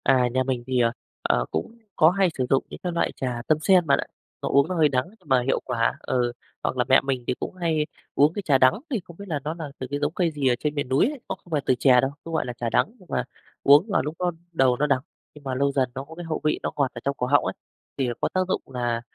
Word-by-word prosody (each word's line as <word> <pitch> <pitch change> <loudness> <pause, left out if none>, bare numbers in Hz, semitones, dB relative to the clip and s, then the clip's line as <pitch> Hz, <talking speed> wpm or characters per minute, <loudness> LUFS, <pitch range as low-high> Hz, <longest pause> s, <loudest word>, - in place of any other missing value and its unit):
À, 130 -2 +4
nhà 130 0 +2
mình 130 -2 -2
thì, 130 -1 +1
ờ, 115 -1 +3 0.3
ờ, - - +1
cũng 220 - -3 0.2
có 160 -1 +6
hay 190 0 +2
sử 130 - +1
dụng 135 - +3
những - - -9
cái 180 - -1
loại 170 - 0
trà 125 -2 -3
tâm 155 - +4
sen 180 0 +5
bạn 140 - +4
ạ, - - -2 0.4
nó - - -2
uống 140 0 +4
nó 185 - -3
hơi 155 -3 +4
đắng 130 -1 +1
nhưng 170 - -22
mà 130 -2 +4
hiệu 130 +2 +1
quả. 115 -2 +1
Ừ, 120 -1 0 0.3
hoặc - - -1
là 125 - +3
mẹ 130 - +7
mình 135 -2 -2
thì - - +2
cũng - - -5
hay 165 -4 0 0.3
uống 150 +3 +4
cái 205 - -3
trà 145 -8 +3
đắng, 130 +7 +4
thì 250 -6 0
không 170 -1 -14
biết 200 - -8
là 155 -5 -1
nó 155 - -2
nà 165 -2 -6
từ 130 - -4
cái 145 - -1
giống 145 +2 -1
cây 175 -2 +1
gì 145 -3 -1
ở 125 - +4
trên 150 -1 -2
miền 140 -3 -2
núi 135 +2 +4
ấy, 295 -2 -7
nó - - -1
không 175 - -21
phải 150 -2 +1
từ 130 - +3
chè 125 -3 +6
đâu, 135 +1 0
cũng 165 - -7
gọi 160 - 0
là 125 - -4
trà 120 - -2
đắng 200 - +2
nhưng 185 - -18
mà 125 - 0 0.4
uống 145 +8 +7
vào 200 - +2
lúc 150 +2 -4
nó 180 -1 +1 0.2
đầu 130 -5 +3
nó 150 - +1
đắng 135 -3 +2 0.3
nhưng 150 - -14
mà 130 -2 -3
lâu 140 +2 +2
dần 130 -3 +1
nó 135 - -4
có 160 +3 -12
cái 175 0 -7
hậu 160 -1 -3
vị 150 - +1
nó - - -1
ngọt 140 -3 +1
ở 120 - -8
trong 140 0 -1
cổ 125 - -1
họng 145 +2 +4
ấy - - -1 0.4
thì 135 - 0
là 120 - -1
có - - +1
tác 185 - +2
dụng 190 - 0
là, 120 -3 -2
140 Hz, 305 wpm, -25 LUFS, 130-165 Hz, 0.4 s, mẹ